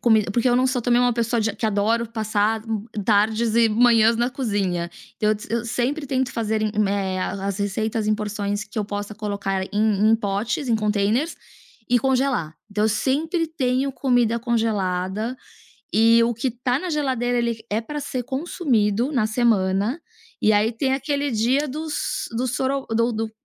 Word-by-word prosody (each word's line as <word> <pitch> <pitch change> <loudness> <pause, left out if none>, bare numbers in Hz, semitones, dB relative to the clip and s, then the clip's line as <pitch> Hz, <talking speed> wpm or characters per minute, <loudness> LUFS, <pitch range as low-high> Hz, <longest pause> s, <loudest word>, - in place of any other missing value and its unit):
comida, 220 -4 +3
porque 240 +4 +2
eu 245 - +3
não 255 +1 +3
sou 255 -2 -1
também 245 0 +3
uma 245 -1 +3
pessoa 235 0 0
de 220 - +1
a 200 - -9
que 225 - -5
adoro 220 +2 +1
passar, 220 0 0
hum, 215 -2 -2 0.2
tardes 220 +2 +2
e 230 -1 +5
manhãs 230 0 +4
na 240 +1 +1
cozinha. 200 - -2 0.3
Eu- 215 0 +3 0.2
eu 235 +1 -1
sempre 260 +6 -1
tento 260 -1 0
fazer, 220 -1 -1 0.2
me 195 -2 0
as 190 +2 -2
as 195 0 -3
receitas 215 +2 -1
em 215 - +3
porções 210 0 -3
que 215 +1 -7
eu 210 - 0
possa 205 +1 -5
colocar 200 -2 -2
em 210 0 +3
em 225 - +5
potes, 220 +6 -2
em 230 - +3
contêineres, 215 +8 0 0.5
e 245 0 +4
congelar. 255 - 0 0.2
Então 210 +1 0
eu - - +3
sempre 310 - 0
tenho 270 -3 0
comida 245 -4 +1
congelada, 215 -1 -1 0.6
eh, 230 +2 +5
o 240 - +1
que 235 +3 -2
tá 245 +2 -1
na 365 - -5
geladeira 255 -5 0
ele 235 -2 -1
é 215 +2 0
pra 295 +6 -5
ser 270 -3 -3
consumido 250 - 0
na 230 -5 +2
semana, 215 - +1 0.4
e 215 - +5
aí 210 +2 +3
tem 265 +3 -1
aquele 285 +1 -1
dia 250 +7 +1
dos 310 +3 -3
do 255 +2 0
soro 265 +2 -1
do 230 +1 +1
do 220 0 -3
225 Hz, 180 wpm, -23 LUFS, 210-250 Hz, 0.6 s, e